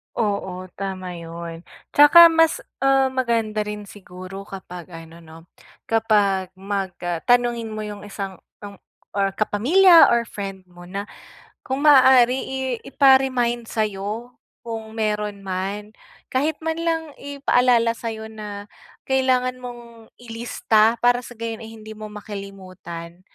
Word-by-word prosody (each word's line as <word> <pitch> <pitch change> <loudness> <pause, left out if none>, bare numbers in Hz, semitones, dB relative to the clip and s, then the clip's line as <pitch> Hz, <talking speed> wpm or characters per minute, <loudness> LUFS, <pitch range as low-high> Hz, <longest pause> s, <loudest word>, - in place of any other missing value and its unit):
Oo, 190 -4 -2
tama 185 -2 -5
yun. 170 0 -8 0.3
Tsaka 335 +4 +8
mas, 325 0 +2 0.2
um, 270 0 +3
maganda 230 -4 0
rin 210 0 -6
siguro 190 0 -10
kapag 180 -3 -9
ano 165 0 -11
'no, 160 -1 -14 0.5
kapag 205 -4 +1
mag, 195 -1 -4
ah 175 -1 -2
tanungin 240 -1 +2
mo 215 0 -4
yung 210 -1 -8
isang 195 -2 -6 0.2
ang 200 -1 -10 0.3
or 195 -1 0
kapamilya 330 - +6
or 235 0 +2
friend 195 -4 -7
mo 175 0 -14
na, 200 +2 -4 0.6
kung 265 +2 -3
maaari 260 -3 +6
i 265 0 -5 0.3
ipa-remind 255 -4 +3
sayo, 215 +3 -3 0.3
kung 225 -1 -7
meron 210 -2 -2
man. 195 +3 -4 0.4
Kahit 290 +4 0
man 320 0 -2
lang 325 -2 -2
ipaalala 250 -4 +2
sayo 225 -1 -6
na 205 -2 -7 0.4
kailangan 255 -1 +1
mong 235 -2 -11
ilista 230 -1 +1
para 245 0 +4
sa 245 -1 -12
gayon 225 0 -5
ay 225 -1 -9
hindi 215 0 -10
mo 215 0 -8
makalimutan. 190 -5 -9
215 Hz, 130 wpm, -22 LUFS, 195-245 Hz, 0.6 s, Tsaka